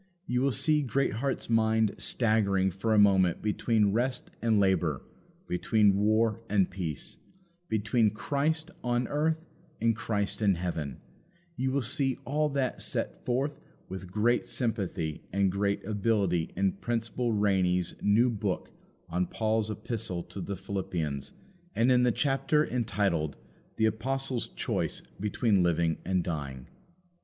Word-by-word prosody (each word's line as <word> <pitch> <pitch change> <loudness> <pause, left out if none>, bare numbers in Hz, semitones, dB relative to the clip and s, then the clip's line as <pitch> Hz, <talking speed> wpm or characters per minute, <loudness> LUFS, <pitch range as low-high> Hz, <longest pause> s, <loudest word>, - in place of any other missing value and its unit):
You 125 -7 0
will 140 - +3
see 150 +4 +2
Greatheart's 135 -1 -1
mind 110 -2 +3
staggering 100 -5 +2
for 95 +5 -2
a 110 - +4
moment 95 -4 +5
between 105 -1 +2
rest 125 +4 -1
and 115 -2 +3
labour, 90 -7 +1 0.4
between 100 +2 +3
war 110 +2 +2
and 100 -3 +3
peace, 85 -7 -5 0.5
between 110 +1 +2
"Christ" 150 - -1
on 120 0 0
earth 160 +2 0 0.3
and 115 -1 +2
"Christ" 105 -1 -1
in 100 -3 +4
heaven 85 -6 -4 0.5
you 130 -2 0
will 135 0 0
see 135 +2 +1
all 150 +3 +1
that 140 -2 -1
set - - -3
forth 135 +4 0 0.3
with 95 -1 -7
great 115 +5 +2
sympathy 95 - -2
and 100 0 +2
great 100 +1 -1
ability 100 -5 +1
in 95 +1 +2
Principal 120 +1 -1
Rainy's 95 -4 +2
new 115 +5 +4
book 100 -4 -3 0.4
on 90 +2 -1
Paul's 110 -1 0
Epistle 105 -4 -4
to 100 - -8
the 100 +3 -4
Philippians, 90 -7 -3 0.4
and 120 +3 +3
in 125 -1 +5
the 125 -1 +4
chapter 145 +4 +2
entitled, 100 - -1 0.4
The 110 - +3
Apostle's 130 +3 -1
Choice - - -3 0.2
between 105 0 +2
Living 85 -2 +2
and 90 -1 0
Dying. 70 -7 -4
110 Hz, 135 wpm, -29 LUFS, 95-120 Hz, 0.5 s, moment